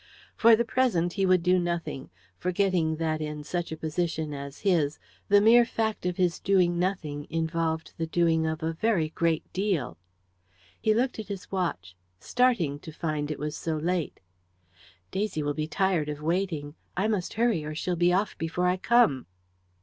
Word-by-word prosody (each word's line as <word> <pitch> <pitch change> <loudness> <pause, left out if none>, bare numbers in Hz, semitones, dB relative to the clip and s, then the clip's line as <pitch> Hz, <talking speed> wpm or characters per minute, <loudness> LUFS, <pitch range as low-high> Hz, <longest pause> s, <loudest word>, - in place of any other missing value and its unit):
For 230 0 +7
the 235 +2 0
present 210 -9 +1
he 195 -1 +1
would 185 -2 +4
do 180 +1 +4
nothing, 170 -5 -3 0.3
forgetting 180 -3 +1
that, 155 -1 -1
in 150 -1 -4
such 175 +2 -3
a 160 - -4
position 160 -1 -2
as 140 0 -7
his, 165 -7 +2 0.3
the 205 0 +7
mere 230 +3 +7
fact 220 -4 -2
of 180 - -2
his 180 -2 +1
doing 180 -3 +2
nothing 160 -6 -2
involved 160 0 -2
the 165 - -1
doing 160 -1 +2
of 160 0 -3
a 165 0 -1
very 170 -3 +1
great 165 0 0
deal. 185 - -1 0.8
He 215 0 +3
looked 250 +1 0
at 215 - -6
his 200 -2 -7
watch, 95 - -2 0.2
starting 235 - +1
to 160 - -9
find 155 -2 -3
it 150 - -3
was 150 +1 -4
so 160 -1 -2
late. 170 +1 -2 0.9
"Daisy 195 -6 -1
will 145 0 -1
be 155 +1 -3
tired 175 -3 0
of 150 -1 -4
waiting. 165 -4 -1 0.2
I 195 +4 +2
must 205 -5 -2
hurry, 225 -8 +2
or 155 0 -5
she'll 180 +3 -1
be 175 +1 +3
off 190 +3 +1
before 165 +2 -1
I 180 +1 +2
come." 190 - +3
170 Hz, 175 wpm, -27 LUFS, 155-195 Hz, 0.9 s, For